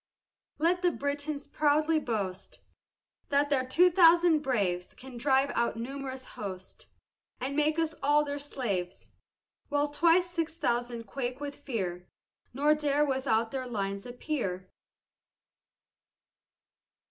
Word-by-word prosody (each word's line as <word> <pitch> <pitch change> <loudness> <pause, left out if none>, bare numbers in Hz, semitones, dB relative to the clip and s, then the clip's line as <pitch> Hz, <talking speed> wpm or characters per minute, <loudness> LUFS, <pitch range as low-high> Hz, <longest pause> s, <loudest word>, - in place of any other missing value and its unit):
Let 350 +2 +1
Britons 285 +1 -3
proudly 305 +2 +2
boast, 200 -8 -4 0.7
"That 285 +1 +2
their 265 -2 +3
two 355 +7 +5
thousand 340 -2 +6
braves 200 -11 -1
Can 260 0 -11
drive 270 +2 +2
our 235 0 0
numerous 260 +2 -6
host, 185 -2 -8 0.5
And 270 +2 -3
make 300 +1 +2
us 325 -1 0
all 295 +2 +3
their 285 0 -4
slaves;" 210 -11 -4 0.6
While 290 0 +1
twice 335 +4 +3
six 330 -2 -3
thousand 240 -5 -1
quake 250 +4 -4
with 285 -1 -5
fear, 185 -10 -4 0.4
Nor 290 +4 +3
dare 295 -1 +1
without 255 -5 0
their 260 -2 -3
lines 200 -2 -3
appear. 240 - -4
275 Hz, 115 wpm, -29 LUFS, 235-300 Hz, 0.7 s, thousand